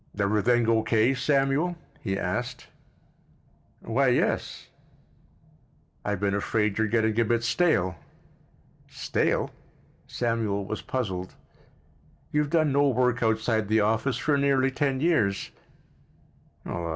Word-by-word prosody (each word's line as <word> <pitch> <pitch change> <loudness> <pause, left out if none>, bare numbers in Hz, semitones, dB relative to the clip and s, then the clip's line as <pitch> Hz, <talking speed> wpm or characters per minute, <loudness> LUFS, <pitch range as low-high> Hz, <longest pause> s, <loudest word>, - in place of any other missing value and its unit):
"Everything 110 +3 +2
O. 115 -1 +3
K., 110 +3 +2
Samuel?" 140 +5 +1 0.2
he 95 -3 -2
asked. 120 +7 -3 1.2
"Why, 130 +4 +1
yes." 125 - 0 1.4
"I've 105 -2 -2
been 100 0 0
afraid 105 +1 0
you're 110 - +2
getting 110 0 +1
a - - +5
bit 115 +1 0
stale." 115 - +1 0.9
"Stale?" - - -1 0.6
Samuel 110 -4 -1
was 110 +2 -5
puzzled. 95 -8 -4 1.0
"You've 150 -1 +1
done 155 -2 +2
no 140 +1 +3
work 125 -1 +1
outside 110 -1 +1
the 110 +1 +3
office 110 +4 +1
for 140 +1 +1
nearly 135 -1 +2
ten 135 -1 -1
years?" 145 - +1
115 Hz, 110 wpm, -26 LUFS, 105-135 Hz, 1.4 s, a